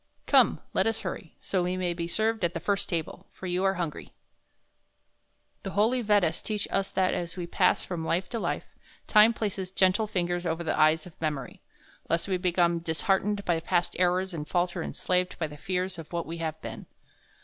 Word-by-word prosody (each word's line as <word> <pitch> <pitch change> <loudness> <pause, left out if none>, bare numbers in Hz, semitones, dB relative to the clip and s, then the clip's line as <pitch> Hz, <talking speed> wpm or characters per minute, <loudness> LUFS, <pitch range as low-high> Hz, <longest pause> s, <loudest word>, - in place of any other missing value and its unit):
"Come, - - +4
let - - +2
us 225 0 -1
hurry, 165 - -6
so 185 - -1
we 180 +1 -1
may 180 -2 0
be 170 0 -3
served 220 +3 0
at 175 +1 +1
the - - -1
first 200 +3 -1
table, 165 -3 -3
for - - -10
you 180 +1 0
are 195 0 +3
hungry." 170 -4 -3
II - - -24 1.5
The - - -5
holy 235 +5 +3
Vedas 205 -7 +2
teach 210 -2 -2
us 195 0 0
that 185 -1 +1
as 175 +1 -4
we 175 - -3
pass 180 +1 +2
from 175 -3 -4
life 175 +3 0
to 230 - -3
life, - - -2 0.4
Time 215 +1 +7
places 200 -5 -3
gentle 190 +3 +3
fingers 175 -3 -1
over 165 0 -1
the 160 - 0
eyes 155 +1 +4
of 175 -3 -14
memory, 150 -5 -3 0.5
lest 165 +2 +1
we 190 -2 +1
become 175 -1 +2
disheartened 195 +5 0
by 170 -2 +2
past 175 +2 0
errors 180 +1 +2
and 155 -2 -5
falter 175 0 0
enslaved 180 0 -1
by 165 - -1
the 150 -1 -8
fears 185 +2 -2
of 160 - -10
what 170 -1 -2
we 165 +1 -6
have 160 -1 -3
been. - - -7
180 Hz, 200 wpm, -28 LUFS, 170-195 Hz, 1.5 s, Time